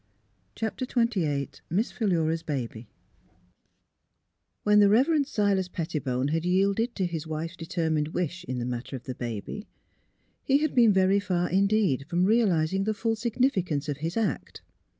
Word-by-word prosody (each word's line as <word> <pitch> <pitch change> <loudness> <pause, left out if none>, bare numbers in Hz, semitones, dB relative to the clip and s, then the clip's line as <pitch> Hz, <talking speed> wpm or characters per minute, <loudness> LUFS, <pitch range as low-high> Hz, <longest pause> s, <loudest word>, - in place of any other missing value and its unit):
CHAPTER 225 +3 -3
XXVIII 190 - -1
MISS 205 +8 0
PHILURA'S 165 -7 0
BABY 125 -7 -4 1.8
When 210 0 +5
the'* 200 -1 +6
E 215 - +6
ever 275 +7 +3
end 290 -3 +2
Silas 200 -7 +1
Pettibone 145 -6 -2
had 165 +2 0
yielded 195 +6 +1
to 190 - 0
his 165 -3 -4
wife's 160 +3 -4
determined 160 -2 -1
wish 180 +2 -3
in 130 - -4
the 120 - -2
matter 125 +2 -4
of 125 - -8
the 130 - -5
baby, 120 - -6 0.8
he 275 - +3
had 305 +1 0
been 235 -4 +6
veiy 190 +1 +3
far 180 -2 -1
indeed 195 - +2
from 175 +1 +2
realising 195 -4 +2
the 215 0 0
full 225 +1 0
significance 210 - 0
of 145 -2 -2
his 165 +7 -3
act. 210 - -2
180 Hz, 155 wpm, -27 LUFS, 155-215 Hz, 1.8 s, the